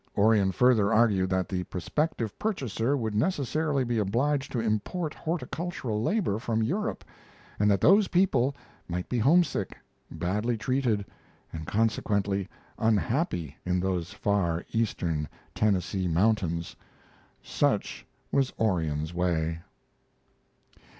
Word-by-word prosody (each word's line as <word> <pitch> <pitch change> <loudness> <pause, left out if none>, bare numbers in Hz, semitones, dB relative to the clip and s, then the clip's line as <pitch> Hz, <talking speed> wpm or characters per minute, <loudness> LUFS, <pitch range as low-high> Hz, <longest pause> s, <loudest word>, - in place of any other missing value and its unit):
Orion 100 -2 +4
further 110 -2 +4
argued 105 -5 +3
that 95 -1 0
the 90 -2 -2
prospective 115 - -2
purchaser 140 - -1
would 110 -4 -2
necessarily 145 - 0
be 120 -2 0
obliged 135 +8 0
to 120 - -1
import 115 - -1
horticultural 160 -8 -3
labor 170 - 0
from 115 -1 0
Europe, 210 - -2 0.5
and 105 0 +4
that 100 -2 +2
those 200 +3 +6
people 140 -8 +2 0.3
might 90 +1 -3
be 125 - 0
homesick, 145 - +2 0.3
badly 105 +8 -1
treated, 120 -3 0 0.5
and 80 -1 -6
consequently 100 -3 0 0.3
unhappy 110 - 0
in 90 0 0
those 90 -2 -1
far 100 -5 0
eastern 85 - -1 0.2
Tennessee 95 -2 0
mountains. 85 -2 +1 0.7
Such - - 0 0.3
was 135 -2 +2
Orion's 80 -7 0
way. 85 -2 0
110 Hz, 110 wpm, -28 LUFS, 95-130 Hz, 0.7 s, those